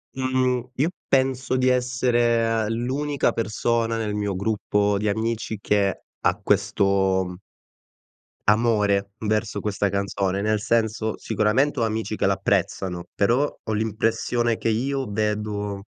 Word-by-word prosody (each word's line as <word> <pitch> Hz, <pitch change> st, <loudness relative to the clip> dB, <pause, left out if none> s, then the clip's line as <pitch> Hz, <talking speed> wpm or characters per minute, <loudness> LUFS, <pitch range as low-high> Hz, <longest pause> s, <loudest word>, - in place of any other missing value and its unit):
Mhmm, 130 Hz, -1 st, 0 dB
io 150 Hz, +5 st, +1 dB, 0.2 s
penso 130 Hz, -1 st, +1 dB
di 130 Hz, 0 st, +2 dB
essere 120 Hz, -3 st, +2 dB
l'unica 135 Hz, +5 st, 0 dB
persona 115 Hz, +1 st, 0 dB
nel 105 Hz, -2 st, -2 dB
mio 105 Hz, -2 st, -1 dB
gruppo 105 Hz, 0 st, 0 dB
di 105 Hz, -, -1 dB
amici 110 Hz, 0 st, -2 dB
che 100 Hz, -2 st, +1 dB, 0.2 s
ha 90 Hz, +3 st, +1 dB
questo 100 Hz, -2 st, +1 dB, 1.1 s
amore 105 Hz, -3 st, +2 dB
verso 105 Hz, -1 st, 0 dB
questa 100 Hz, 0 st, -1 dB
canzone, 100 Hz, 0 st, -1 dB
nel 105 Hz, 0 st, +1 dB
senso 110 Hz, -1 st, 0 dB
sicuramente 125 Hz, +6 st, +1 dB
ho -, -, +3 dB
amici 110 Hz, 0 st, -2 dB
che -, -, 0 dB
l'apprezzano, 90 Hz, -2 st, 0 dB
però 120 Hz, +8 st, +2 dB
ho 110 Hz, -, -3 dB
l'impressione 115 Hz, +2 st, 0 dB
che 115 Hz, -, -1 dB
io 135 Hz, +5 st, 0 dB
vedo 105 Hz, -1 st, -2 dB
110 Hz, 120 wpm, -24 LUFS, 100-120 Hz, 1.1 s, ho